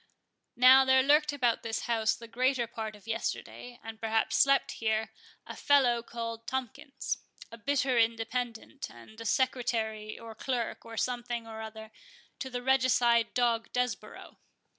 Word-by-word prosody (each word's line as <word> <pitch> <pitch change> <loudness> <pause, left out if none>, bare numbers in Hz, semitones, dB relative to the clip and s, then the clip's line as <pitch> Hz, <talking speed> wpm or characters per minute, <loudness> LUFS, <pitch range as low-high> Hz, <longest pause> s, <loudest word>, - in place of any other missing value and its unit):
Now 260 +2 +8
there 265 0 +5
lurked 300 +2 +4
about 245 -5 +1
this 225 -1 -3
house 225 -2 +1
the 230 - -11
greater 255 +1 +1
part 220 -1 -6
of 205 - -18
yesterday, 235 +2 -4
and 225 0 -9
perhaps 225 0 +1
slept 275 0 +4
here, 220 0 0 0.3
a - - -8
fellow 255 -5 +3
called 230 -1 -6
Tomkins,—a 265 -2 -5
bitter 260 0 +1
Independent, 230 +3 -2
and 120 - -13
a - - -7
secretary, 225 -4 -1
or 230 -1 -9
clerk, 240 +1 -3
or 230 0 -9
something 240 -1 -2
or 220 -1 -8
other, 220 0 -9 0.5
to 265 - -4
the 245 -1 -5
regicide 245 -3 +3
dog 235 -2 +1
Desborough. 245 -4 -3
235 Hz, 140 wpm, -30 LUFS, 225-255 Hz, 0.5 s, Now